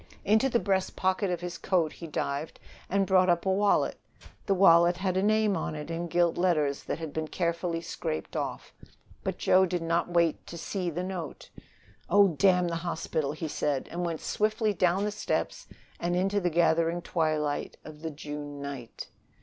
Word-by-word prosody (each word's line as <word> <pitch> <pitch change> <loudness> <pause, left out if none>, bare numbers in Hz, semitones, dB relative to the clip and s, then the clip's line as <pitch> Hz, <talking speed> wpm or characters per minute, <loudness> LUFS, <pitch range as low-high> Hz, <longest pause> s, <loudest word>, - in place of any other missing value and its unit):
Into 220 +6 +4
the 235 - +2
breast 190 -4 0
pocket 190 +1 +1
of 175 -1 -2
his 175 -1 -5
coat 170 -5 +1
he 170 - -8
dived 145 0 -3 0.3
and 195 0 +2
brought 185 -1 +4
up 175 +1 +2
a 190 - +2
wallet. 205 +2 +2 0.5
The 195 - +3
wallet 175 -2 +6
had 185 -1 -1
had 190 - +1
a - - +3
name 215 -2 +3
on 155 - -3
it 150 +2 -6
in 170 +1 -3
gilt 175 0 +1
letters 155 -6 +1
that - - -2
had 160 -3 -6
been 160 0 -2
carefully 170 0 -1
scraped 80 - -4
off. - - -4 0.5
But - - -2
Joe 190 0 +4
did 175 -1 -2
not 170 +1 0
wait 170 -2 +1
to 170 - -7
see 180 +1 -3
the 175 +2 -3
note. 180 -4 -6 0.6
"Oh, 200 +1 +6
damn 180 +2 +3
the 170 -1 -2
hospital!" 160 -4 -2
he 155 +1 -4
said 145 -2 -1
and 175 +1 -3
went 165 -2 -3
swiftly 215 0 0
down 180 +1 +2
the 210 - 0
steps 215 - -2 0.3
and 175 +1 -1
into 195 +3 +1
the 175 - +1
gathering 170 +1 +2
twilight 155 -4 -1
of 155 -1 -11
the 160 - -3
June 145 -1 -7
night. 140 -5 -7
175 Hz, 190 wpm, -28 LUFS, 160-190 Hz, 0.6 s, wallet